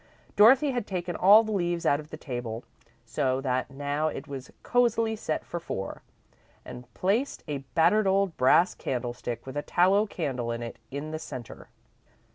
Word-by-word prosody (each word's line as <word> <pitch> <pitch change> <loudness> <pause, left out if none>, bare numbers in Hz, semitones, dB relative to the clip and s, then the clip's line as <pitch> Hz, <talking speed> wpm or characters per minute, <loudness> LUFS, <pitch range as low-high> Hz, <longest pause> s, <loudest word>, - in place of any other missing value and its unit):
Dorothy 260 +7 +6
had 245 -4 -3
taken 180 -2 -3
all 205 +4 +7
the 220 - -4
leaves 175 -4 -1
out 145 - +3
of 155 0 -10
the 155 - -8
table, 120 -6 -5 0.4
so 130 +3 0
that 130 -1 -1
now 145 +3 -2
it 155 - -5
was 135 -2 -7
cosily 230 -2 +2
set 180 -7 -3
for 170 - -5
four, 95 - -5 0.6
and 125 0 -10
placed 220 +9 0
a 145 -2 -3 0.2
battered 195 +6 +4
old 195 -2 +2
brass 170 +8 +4
candlestick, 120 -1 -4
with 130 - -8
a 145 - -1
tallow 190 +7 +3
candle 130 -11 -3
in 115 0 -4
it, 115 - -7
in 145 +3 -5
the 155 - -4
centre. 120 -7 -9
155 Hz, 170 wpm, -27 LUFS, 130-200 Hz, 0.6 s, all